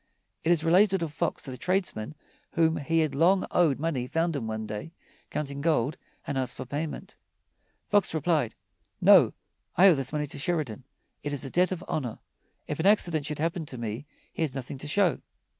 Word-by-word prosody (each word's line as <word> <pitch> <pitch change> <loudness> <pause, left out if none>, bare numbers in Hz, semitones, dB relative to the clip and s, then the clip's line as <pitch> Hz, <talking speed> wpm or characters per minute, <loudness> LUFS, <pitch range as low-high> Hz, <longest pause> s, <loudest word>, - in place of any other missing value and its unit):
It 165 - +2
is 165 -2 +3
related 185 +2 +4
of 155 -3 -4
Fox - - -2
that 135 - -5
a 125 - -9
tradesman 180 - -1 0.4
whom 160 -1 +3
he 160 +2 +1
long 165 +7 +3
had - - -6
owed 160 -7 +3
money 145 -6 -1
found 165 +3 0
him 120 -6 -3
one 110 0 -3
day 105 +10 -6 0.4
counting 140 -2 -4
gold 150 -3 +1 0.3
and 135 - -2
asked 130 -1 0
for - - -5
payment. 145 +4 -5 0.7
Fox 205 -2 +3
replied: 155 -6 +1 0.4
"No; - - +7 0.4
I 190 +4 +7
owe - - +7
this 135 -3 -2
money 150 -1 -1
to 145 - -6
Sheridan. 140 -7 -2 0.4
It 145 0 -3
is 145 0 -2
a 135 - -6
debt 180 +1 +3
of 180 -1 -4
honor. 125 -7 -3 0.5
If 150 - -4
an 170 - +2
accident 170 -8 +3
should 150 -1 -3
happen 165 +2 -1
to 130 - -6
me, 115 +4 -5 0.3
he - - -5
has 150 -5 0
nothing 135 0 -6
to 150 - -5
show." 175 -2 +2
150 Hz, 195 wpm, -28 LUFS, 135-170 Hz, 0.7 s, No